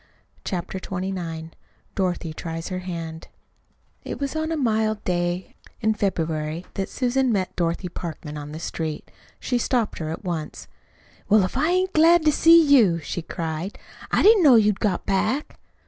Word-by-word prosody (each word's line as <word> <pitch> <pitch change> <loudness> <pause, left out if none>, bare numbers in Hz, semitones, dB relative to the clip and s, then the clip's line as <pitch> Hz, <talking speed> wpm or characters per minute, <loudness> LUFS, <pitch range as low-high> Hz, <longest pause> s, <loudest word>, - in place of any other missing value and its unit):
CHAPTER 185 +1 -4
XXIX 180 -4 -5 0.4
DOROTHY 175 -4 -2
TRIES 165 +1 -5
HER 185 -1 -3
HAND 165 -3 -6 0.8
It - - -6
was 280 +1 -3
on 315 +1 -1
a 325 - -1
mild 220 -5 0
day 175 0 -1
early - - -28 0.3
in 220 -1 +2
February 165 -5 -2
that 195 - -3
Susan 255 0 +1
met 190 -4 -1
Dorothy 170 +1 -1
Parkman 160 -3 -7
on 150 0 -7
the 155 - -6
street. 160 -2 -5 0.3
She 245 - -1
stopped 240 -2 0
her 155 -2 -3
at 160 - -5
once. 170 -5 -5 0.6
"Well, 210 -1 +6
if 185 - -3
I 300 +5 +2
ain't 370 +1 +1
glad 325 +1 +5
to 305 - +6
see 330 +3 +7
you!" 235 - +5
she 165 +3 -4
cried. 165 +2 -4 0.3
"I - - +3
didn't 430 -1 +7
know 280 -7 +7
you'd 210 -2 +4
got 200 -5 -1
back." 215 +9 -1
190 Hz, 165 wpm, -24 LUFS, 165-245 Hz, 0.8 s, see